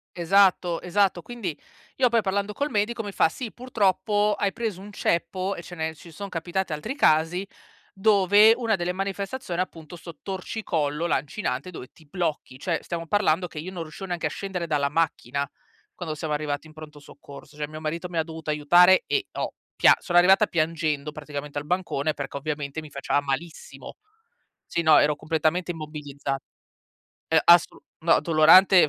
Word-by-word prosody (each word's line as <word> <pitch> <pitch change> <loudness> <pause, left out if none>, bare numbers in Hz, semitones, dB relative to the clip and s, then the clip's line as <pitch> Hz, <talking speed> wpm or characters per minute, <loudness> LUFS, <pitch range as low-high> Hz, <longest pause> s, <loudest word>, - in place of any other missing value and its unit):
Esatto, 180 -1 +3
esatto. 185 0 +1
Quindi, 205 -8 -5 0.4
io, 255 -2 +4
poi, 230 -1 +3
parlando 200 +1 -1
col 285 +6 -2
medico, 225 +2 0
mi 205 - -5
fa: 175 - +3
"Sì, 230 +5 -6
purtroppo 210 -3 +1
hai 200 -1 0
preso 215 -5 -4
un 205 +1 -10
ceppo 185 +1 -1
e - - -7
ce 175 +1 -10
ne 160 -1 -3
ci 165 +2 -14
son 200 +5 -7
capitati 175 0 -3
altri 185 - -4
casi, 165 - +2 0.5
dove 205 +1 +5
una 230 -3 0
delle 175 -1 -2
manifestazioni, 195 +1 -3
appunto, 165 -2 -7
'sto 170 -1 -11
torcicollo 170 -6 -2
lancinante 140 -1 -2
dove 145 -8 -10
ti 160 - -21
blocchi." 155 -5 -3
Cioè, 165 +2 -1
stiamo 165 -1 -5
parlando 180 -2 +2
che 155 - -8
io 175 +5 -6
non 175 -3 -5
riuscivo 160 +5 -9
neanche 175 -2 -3
a - - -4
scendere 185 +1 -4
dalla 145 -3 +1
macchina, 140 -3 -1 0.4
quando 160 -4 -5
siamo 155 0 -3
arrivati 150 0 -3
in 155 - -16
pronto 155 -1 -11
soccorso. 145 0 -14
Cioè, 150 0 -4
mio 155 +1 -9
marito 165 +3 -4
mi 170 - -5
ha 160 - +2
dovuto 160 -1 -8
aiutare 175 +5 +5
e 410 -2 -1
ho - - -3 0.2
pia - - +6
sono 175 -2 0
arrivata 190 +4 +6
piangendo, 155 -2 -1
praticamente, 145 -1 -7
al 145 - -3
bancone, 155 -3 -1
perché, 140 -2 -6
ovviamente, 145 +1 -4
mi 155 - -11
faceva 140 0 -1
malissimo. 145 +4 -6 0.7
Sì, - - -1
no, 160 -1 +7
ero 150 0 +3
completamente 160 +4 0
immobilizza 150 -4 -5 1.0
E 160 - +6
assolu 170 0 +5 0.2
no, 165 0 +4
dolorante, 170 +2 +6
170 Hz, 170 wpm, -25 LUFS, 155-195 Hz, 1.0 s, no